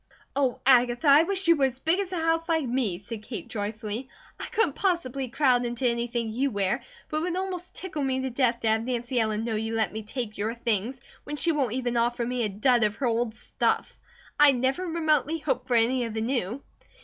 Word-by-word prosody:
"Oh, 270 -3 +1
Agatha, 245 +2 +4
I 285 +2 +8
wish 385 +2 -1
you 335 - +7
were 280 -3 +3
as 260 0 -3
big 325 +6 +1
as 390 -2 -3
a 365 - -2
house, 330 +1 0
like 320 -3 +2
me," 240 -7 0
said 210 +3 -8
Kate, 225 +2 -7
joyfully. 215 +3 -4 0.3
"I - - -4
couldn't 400 -10 +1
possibly 275 -9 -1
crowd 250 -1 +2
into 240 +1 -1
anything 235 -1 -1
you 270 +4 +1
wear, 200 -5 0 0.3
but 310 - -2
it - - +2
would 350 +1 -1
almost 365 -1 -4
tickle 315 -6 -4
me 260 -1 0
to 260 0 -3
death 240 -1 +1
to 225 - 0
have 220 +1 +2
Nancy 245 0 -1
Ellen 220 -1 0
know 230 -1 -2
you 225 +1 -2
let 220 -4 0
me 220 - -4
take 215 -1 -5
your 220 +3 -1
things, 235 +2 -1 0.2
when 295 - -5
she 335 +3 +1
won't 275 -7 0
even 245 -1 -1
offer 240 +1 +1
me 250 +1 -2
a 215 - 0
dud 235 +4 +2
of 210 0 +1
her 275 - -2
old 230 -1 0
stuff; - - -1 0.4
I 295 -2 +8
never 265 +8 0
remotely 315 -2 +1
hoped 300 -4 -2
for 245 - +1
any 240 +2 +4
of 225 -1 -6
the 220 - -1
new." 240 +1 -2
250 Hz, 225 wpm, -27 LUFS, 230-295 Hz, 0.4 s, I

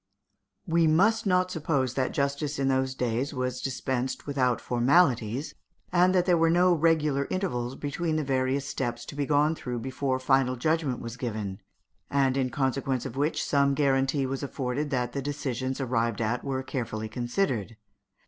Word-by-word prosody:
We 165 -2 +3
must 215 +8 +3
not 180 -1 +2
suppose 145 -6 0
that 130 -1 0
justice 140 +1 -1
in 135 -1 +1
those 130 0 0
days 125 +4 -1
was 125 0 -2
dispensed 130 -1 -2
without 130 -4 +1
formalities, 125 -1 +2 0.4
and 180 +1 +4
that 180 -1 +3
there 175 -3 +3
were 165 0 +4
no 175 +2 +4
regular 155 -4 +2
intervals 130 -10 -2
between 155 +3 -2
the 155 - 0
various 135 0 0
steps 120 -2 -3
to - - -9
be 145 -1 -1
gone 150 +1 +3
through 125 -6 -5
before 130 +2 -2
final 130 -1 +2
judgment 155 -1 0
was 115 +1 -7
given, 110 -6 -4 0.5
and 135 -2 +2
in 130 -2 +1
consequence 130 0 -1
of 130 -2 -6
which 145 +3 0
some 140 -1 +2
guarantee 135 -1 +2
was 135 0 -3
afforded 140 +1 -3
that 125 -3 -1
the 140 - -2
decisions 130 -2 -3
arrived 115 -4 0
at 115 +2 -1
were 130 -1 -2
carefully 115 -4 -4
considered. 120 - -2
135 Hz, 165 wpm, -27 LUFS, 125-150 Hz, 0.5 s, and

